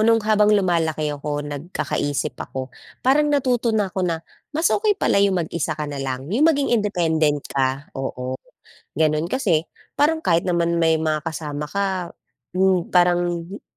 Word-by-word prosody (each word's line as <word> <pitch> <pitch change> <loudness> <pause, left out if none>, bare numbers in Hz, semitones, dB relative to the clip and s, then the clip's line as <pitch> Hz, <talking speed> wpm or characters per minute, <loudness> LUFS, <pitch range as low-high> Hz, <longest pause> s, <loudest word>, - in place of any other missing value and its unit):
noong 225 0 +3
habang 210 -1 +4
lumalaki 160 -5 0
ako, 145 0 -4
nagkakaisip 145 -1 -2
ako, 130 -1 -6 0.3
parang 295 +3 +4
natuto 255 -5 +1
na 200 -3 0
ako 190 - -2
na 170 -2 -1 0.3
mas 325 +1 +2
okey 415 -1 +2
pala 200 - +2
yung 200 -1 +3
mag-isa 160 -2 -2
ka 150 - -3
na 145 -1 -5
lang, 130 -1 -3
yung 290 +9 +4
maging 285 -5 +1
independent 160 -9 +1
ka, 135 +1 -2
oo. 130 -1 -4 0.6
Gano'n, 155 +2 +1
kasi 185 - +1 0.3
parang 315 +2 +2
kahit 170 - +2
naman 170 -2 +1
may 160 -1 +3
mga 155 -1 -1
kasama 150 -3 -4
ka, 190 +1 -2 0.4
hmm, 185 -1 +1
parang 175 -1 +2
hindi 195 +3 -9
170 Hz, 155 wpm, -22 LUFS, 150-205 Hz, 0.6 s, habang